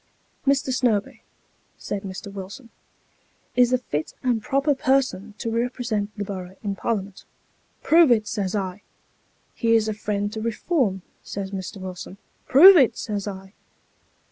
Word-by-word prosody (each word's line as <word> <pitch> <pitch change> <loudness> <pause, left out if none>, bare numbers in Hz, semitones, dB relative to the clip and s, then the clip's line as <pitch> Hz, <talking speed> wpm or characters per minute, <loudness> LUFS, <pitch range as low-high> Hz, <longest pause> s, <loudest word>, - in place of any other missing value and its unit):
' - - -33
Mr. 275 -1 +2
Snobee,' 230 -6 0 0.6
said 205 - -4
Mr. 195 0 -8
Wilson, 200 +5 -9 0.4
' - - -40
is 245 -1 +4
a 255 - +4
fit 155 -11 -4
and 245 -3 +1
proper 275 +4 +1
person 260 -6 0
to 230 - -3
represent 230 -3 -1
the 205 - -2
borough 190 -2 -7
in 200 -2 -2
Parliament.' 200 -2 -3 0.3
' - - -40
Prove 330 -1 +6
it,' 220 -3 +3
says 195 -1 -2
I. 190 -1 -3 0.4
' - - -41 0.3
He 230 -1 +2
is 220 -1 +2
a 215 - -1
friend 205 0 -3
to 220 - -4
Keform,' 225 - -1 0.2
says 195 -1 -6
Mr. 195 +1 -6
Wilson. 185 0 -8 0.2
' - - -40
Prove 355 +8 +10
it,' 265 -7 +4
says 205 -2 -4
I. 190 -1 -8
215 Hz, 165 wpm, -24 LUFS, 195-250 Hz, 0.6 s, Prove